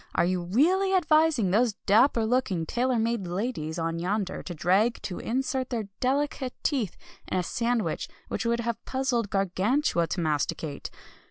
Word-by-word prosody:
Are - - +3
you 180 0 0
really 350 - +2
advising 310 - +3
those 225 +2 +3
dapper 225 +2 +4
looking, 220 -8 0
tailor 245 +7 0
made 225 -4 0
ladies 175 -4 -3
on 165 0 -2
yonder 190 +2 -2
drag 190 +7 +1
to 180 - -4
insert 260 +1 -1
their 225 -5 -3
delicate 270 0 -1
teeth 245 - 0 0.3
in - - -1
a 180 - +1
sandwich 230 -4 -1 0.2
which - - -3
would 235 0 +1
have 235 -1 -3
puzzled 260 -5 -1
Gargantua 195 - +1
to 175 - -3
masticate?" 150 -1 -2
225 Hz, 150 wpm, -27 LUFS, 180-255 Hz, 0.3 s, dapper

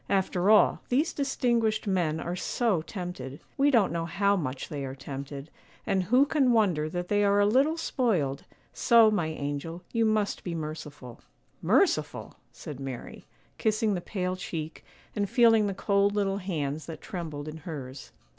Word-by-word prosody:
After 190 -1 +1
all, 215 -1 +5
these 285 +7 +1
distinguished 235 -6 0
men 175 -6 0
are 175 +2 -3
so 205 -1 0
tempted; 165 -7 -7 0.2
we 280 +1 +3
don't 230 -8 +3
know 165 0 -2
how 200 +4 +2
much 130 -7 -3
they 145 -2 -4
are 135 0 -5
tempted; 140 +1 -7 0.3
and 190 - +1
who 250 +8 +4
can 280 -4 +2
wonder 180 -9 +2
that 175 +2 -4
they 205 +1 +2
are 200 0 +3
a 205 - +5
little 270 +9 +3
spoiled; 195 - 0 0.3
so, 230 -2 +5
my 175 -7 0
angel, 155 +3 -5
you 230 -1 +2
must 215 -2 0
be 175 -2 -4
merciful.' 150 -5 -7 0.4
'Merciful!' - - +1 0.2
said 145 -3 -9
Mary, 135 -3 -7 0.3
kissing 215 0 +1
the 180 - -2
pale 185 -1 -3
cheek 160 -4 -6 0.3
and 205 -2 -1
feeling 225 -4 +5
the 195 - -3
cold 200 +1 +2
little 200 -1 0
hands 155 -6 -3
that 160 -2 -7
trembled 155 -5 -6
in 155 +1 -6
hers. 140 - -8
185 Hz, 165 wpm, -28 LUFS, 155-215 Hz, 0.4 s, all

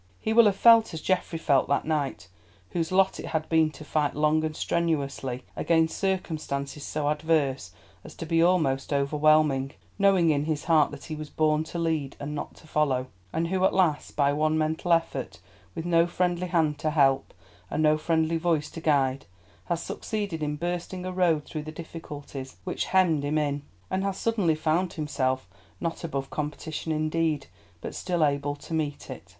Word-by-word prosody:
He 220 - -1
will 230 0 +7
have 205 -2 +4
felt 230 -4 +6
as 160 - -5
Geoffrey 180 -2 0
felt 140 -5 +2
that 140 - +1
night, 150 - -2 0.4
whose 165 -1 -1
lot 190 +1 +3
it - - -6
has 160 -1 -1
been 160 -1 +3
to 155 - -11
fight 150 -1 0
long 155 +1 +2
and 155 -1 -2
strenuously 140 -7 -1
against 165 -1 +2
circumstances 155 -7 -2
so 150 -1 -2
adverse 150 - 0 0.3
as - - -11
to 165 - -6
be 165 +1 +2
almost 155 -7 +2
overwhelming, 145 -1 +3 0.3
knowing 190 -5 +4
in 145 0 0
his 155 -2 -2
heart 160 -3 +4
that 145 -1 -10
he 155 - -5
was 155 -1 -7
born 155 0 +1
to 170 - -6
lead 160 -5 -1
and 145 +1 -5
not 145 - -5
to - - -17
follow; 135 -5 0 0.2
and 165 +1 -1
who 185 0 0
at 190 - +3
last, 170 -6 +1
by 140 -1 +3
one 155 +1 +1
mental 160 +3 -1
effort, 140 - 0 0.4
with 165 - -4
no 170 -1 +4
friendly 180 0 0
hand 160 -4 +1
to 155 - 0
help, 140 -3 +2 0.4
and 155 - 0
no 155 0 +5
friendly 160 +1 +1
voice 160 -3 0
to 165 - -8
guide, 140 -4 +1 0.4
has 170 -1 -2
succeeded 205 -7 -4
in 150 0 -1
bursting 175 +3 -4
a 185 - -3
road 170 -5 +2
through 155 - -5
the 155 +1 -7
difficulties 145 -5 -8
which 180 - -2
hemmed 175 -6 +3
him 145 +2 0
in, 145 -1 0 0.3
and 190 +1 0
has 195 -1 -1
suddenly 205 -9 +1
found 165 +3 0
himself, 130 - -1 0.3
not 165 0 -3
above 140 -5 -4
competition 150 +2 -4
indeed, 155 -1 0 0.4
but - - -6
still 175 -4 0
able 145 0 -1
to 155 - -10
meet 150 -3 -2
it. 130 -7 -9
155 Hz, 185 wpm, -27 LUFS, 145-170 Hz, 0.4 s, will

